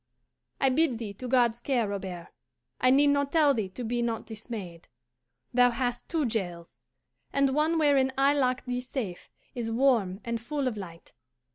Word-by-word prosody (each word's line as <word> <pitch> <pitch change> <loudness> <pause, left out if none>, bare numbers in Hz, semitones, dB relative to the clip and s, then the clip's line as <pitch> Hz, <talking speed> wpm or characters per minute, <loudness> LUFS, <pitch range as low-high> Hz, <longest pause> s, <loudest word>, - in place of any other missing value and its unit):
"I 270 - +4
bid 265 -2 +2
thee 220 -3 -6
to 250 +6 -7
God's 240 -2 +2
care, 245 -6 +1
Robert. 190 -4 -5 0.5
I 255 - +4
need 285 +2 +5
not 285 0 +1
tell 300 -4 +4
thee 215 -6 -2
to 245 +7 -7
be 240 +1 -1
not 230 -2 -2
dismayed. 210 -6 -8 0.7
Thou 245 0 +6
hast 245 0 -3
two 320 -4 0
jails, 175 -7 -4 0.5
and 275 -1 +2
one 310 +3 +2
wherein 280 -4 +3
I 275 +1 +4
lock 255 -3 0
thee 250 0 -2
safe 245 -8 -5 0.2
is 235 -2 -3
warm 225 -6 +2
and 235 -1 -2
full 285 +2 -2
of 245 - -2
light. 170 -5 -10
245 Hz, 170 wpm, -28 LUFS, 220-275 Hz, 0.7 s, Thou